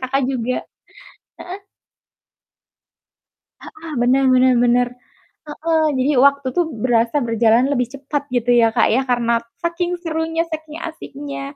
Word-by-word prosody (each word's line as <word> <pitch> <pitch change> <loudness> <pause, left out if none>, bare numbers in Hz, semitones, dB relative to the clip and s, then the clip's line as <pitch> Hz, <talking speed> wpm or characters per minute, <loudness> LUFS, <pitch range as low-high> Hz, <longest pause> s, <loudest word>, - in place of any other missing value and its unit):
Kakak 260 +1 -1
juga 255 -1 -2 0.9
heeh. 375 +3 -8 2.0
Heeh, 375 -7 -11
benar 260 +3 +3
benar 255 0 +4
benar. 245 0 +3 0.6
Heeh, 315 +2 -1
jadi 260 +3 +1
waktu 280 -1 +3
tuh 350 - +3
berasa 235 +3 +1
berjalan 230 +2 +2
lebih 250 -3 0
cepat 285 +1 -4
gitu 245 -1 0
ya 230 -1 +5
,Kak, - - +3
ya, 255 - +2
karena 235 -1 +1 0.3
saking 345 +1 -2
serunya, 325 -1 -1
saking 315 0 -7
asiknya. 285 -3 -7
275 Hz, 125 wpm, -19 LUFS, 245-315 Hz, 2.0 s, ya